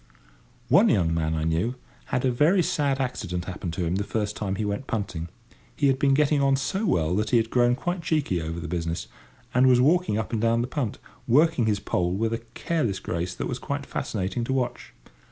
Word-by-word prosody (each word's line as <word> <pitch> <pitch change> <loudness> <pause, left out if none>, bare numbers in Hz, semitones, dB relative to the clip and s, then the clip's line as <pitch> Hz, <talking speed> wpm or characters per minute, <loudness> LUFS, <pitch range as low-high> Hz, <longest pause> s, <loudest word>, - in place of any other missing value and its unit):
One - - +5
young 85 -4 +2
man 80 -1 0
I 80 - -1
knew 85 +10 0 0.3
had 125 - -1
a 130 - +3
very 160 +9 +3
sad 140 -3 0
accident 90 -9 -3
happen 95 -1 -5
to 85 +2 -2
him 85 +3 0
the 100 - 0
first 105 0 -2
time 100 -2 -2
he 105 +2 -2
went 100 +6 -3
punting. 90 -6 -3 0.5
He 145 - 0
had 135 -1 +3
been 135 -1 +4
getting 150 0 +3
on 135 0 +4
so 190 +10 -1
well 85 - +1
that 110 0 0
he 120 - +4
had 115 0 0
grown 120 0 +3
quite 175 +6 -3
cheeky 150 - 0
over 80 +1 -4
the 85 - -5
business, 85 0 -3 0.5
and 125 +1 +5
was 125 -1 +5
walking 155 -3 +3
up 110 +1 -3
and 110 - 0
down 115 0 +2
the 120 - -2
punt, 130 -5 -3 0.3
working 145 -1 +4
his 105 -2 +1
pole 90 -2 -1
with 115 +3 0
a 115 - -1 0.2
careless 120 - -1
grace 85 +1 -3
that - - -3
was 125 - -3
quite 140 0 -4
fascinating 105 +1 -3
to 130 - -1
watch. 130 -2 -3
115 Hz, 220 wpm, -25 LUFS, 90-135 Hz, 0.5 s, One